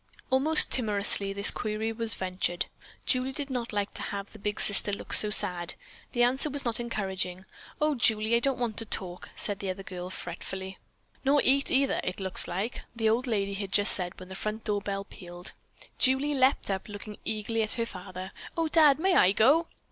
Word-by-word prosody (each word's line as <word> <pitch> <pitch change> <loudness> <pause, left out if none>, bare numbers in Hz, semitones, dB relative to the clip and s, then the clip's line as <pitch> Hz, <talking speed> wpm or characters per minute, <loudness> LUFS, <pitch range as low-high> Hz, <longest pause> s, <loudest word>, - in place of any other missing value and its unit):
Almost 290 +5 +6
timorously 205 -4 +3
this 200 0 +6
query 215 +1 -3
was 225 0 0
ventured. 185 -2 -2 0.4
Julie 255 0 +1
did 285 0 -4
not 245 -2 -3
like 205 -1 -2
to - - -5
have 200 0 -5
the 215 - -14
big 210 +1 -3
sister 205 0 +4
look 200 - -5
so 210 - +5
sad. 180 -5 +2 0.4
The 240 - +2
answer 265 +5 +2
was 285 -1 -2
not 235 -1 0
encouraging. 190 -5 -4 0.3
"Oh, 305 0 +2
Julie, 220 -3 +2
I - - +4
don't 270 +1 0
want 235 -4 -3
to 225 - 0
talk," 180 -4 -4
the 200 -2 -1
other 190 +1 -5
girl 180 -1 -7
said - - -8
fretfully. 190 +2 -7 0.4
"Nor 285 +1 +3
eat, 275 +2 +2
neither, 275 +1 +1
it 180 - -4
looks 190 -2 +1
like," 195 +7 -4
the 225 -1 +1
old 240 +4 0
lady 200 -4 -1
had 195 -1 -5
just 205 +1 +4
said 180 -1 -3
when 185 0 -11
the 190 - -8
front 215 +3 -4
door 205 -2 -1
bell 200 -1 -4
pealed. 175 -2 -8 0.5
Julie 265 +3 +4
leaped 260 -5 +2
up, 190 +2 -4
looking 205 0 -9
eagerly 220 +1 -2
at 215 - +3
her 230 - -1
father. 185 -2 -8 0.3
"Oh, 325 -1 0
Dad, 300 -4 +5
may 370 +4 +1
I 190 - +5
go?" 290 +11 +4
210 Hz, 200 wpm, -28 LUFS, 195-250 Hz, 0.5 s, Almost